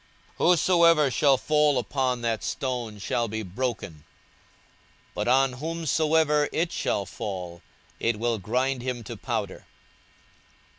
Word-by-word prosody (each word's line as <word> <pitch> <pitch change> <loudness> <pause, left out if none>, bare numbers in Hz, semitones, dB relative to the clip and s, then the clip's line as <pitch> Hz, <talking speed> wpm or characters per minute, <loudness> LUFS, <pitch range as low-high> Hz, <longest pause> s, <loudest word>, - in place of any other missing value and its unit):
42:020:018 - - +3
Whosoever 170 -5 +4
shall 135 +2 +4
fall 150 0 +2
upon 125 -1 -1
that 115 -2 -1
stone 120 -5 -3
shall 115 +3 -1
be 110 0 -4
broken; 100 - -4 1.1
but 105 - -3
on 130 +1 +3
whomsoever 155 0 +1
it 165 +1 -1
shall 100 - -1
fall, 90 -4 -6 0.4
it 115 -2 0
will 115 0 -1
grind 125 +6 -1
him 125 -1 -4
to 115 +2 -7
powder. 110 -4 -4
125 Hz, 120 wpm, -26 LUFS, 110-150 Hz, 1.1 s, Whosoever